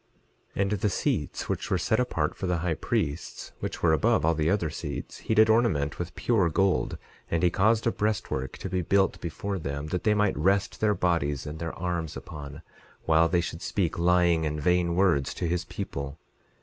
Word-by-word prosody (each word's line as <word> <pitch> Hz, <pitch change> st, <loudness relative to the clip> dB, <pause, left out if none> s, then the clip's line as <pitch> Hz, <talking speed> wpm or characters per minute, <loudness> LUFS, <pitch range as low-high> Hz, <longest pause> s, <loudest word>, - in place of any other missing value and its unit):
11:11 -, -, 0 dB
And 100 Hz, -, -1 dB
the 105 Hz, 0 st, +1 dB
seats -, -, -1 dB
which -, -, -3 dB
were -, -, +2 dB
set -, -, +1 dB
apart -, -, 0 dB
for 95 Hz, -, -4 dB
the 90 Hz, -1 st, +1 dB
high 85 Hz, -, +1 dB
priests, 75 Hz, 0 st, -3 dB
which -, -, -5 dB
were 80 Hz, -2 st, +5 dB
above 75 Hz, -, +2 dB
all 80 Hz, -, +4 dB
the 80 Hz, 0 st, 0 dB
other 90 Hz, -6 st, +1 dB
seats, 75 Hz, -2 st, -6 dB
he 110 Hz, -, -1 dB
did 110 Hz, 0 st, +6 dB
ornament 110 Hz, -11 st, +2 dB
with 90 Hz, 0 st, -5 dB
pure 100 Hz, -8 st, +2 dB
gold; 90 Hz, -6 st, +1 dB, 0.3 s
and 85 Hz, 0 st, 0 dB
he 90 Hz, -, +4 dB
caused 110 Hz, +5 st, +2 dB
a 115 Hz, -, +3 dB
breastwork 100 Hz, -12 st, -2 dB
to -, -, -5 dB
be 90 Hz, 0 st, -1 dB
built 95 Hz, +3 st, +1 dB
before 95 Hz, +4 st, -3 dB
them, 70 Hz, -1 st, -4 dB
that 90 Hz, +2 st, -2 dB
they 105 Hz, -1 st, +3 dB
might 105 Hz, -2 st, +2 dB
rest 100 Hz, +8 st, +1 dB
their 105 Hz, -1 st, +3 dB
bodies 75 Hz, -7 st, 0 dB
and 75 Hz, +1 st, -6 dB
their 85 Hz, 0 st, -4 dB
arms 85 Hz, -3 st, -3 dB
upon 70 Hz, +1 st, -9 dB, 0.4 s
while 80 Hz, +1 st, +4 dB
they 90 Hz, 0 st, +2 dB
should 85 Hz, -1 st, -5 dB
speak 85 Hz, -4 st, -1 dB
lying 85 Hz, -1 st, +3 dB
and 75 Hz, -1 st, -2 dB
vain 90 Hz, +2 st, +2 dB
words 85 Hz, -8 st, +2 dB
to -, -, -3 dB
his 90 Hz, +1 st, -1 dB
people. 70 Hz, -7 st, -5 dB
85 Hz, 200 wpm, -27 LUFS, 80-95 Hz, 0.4 s, did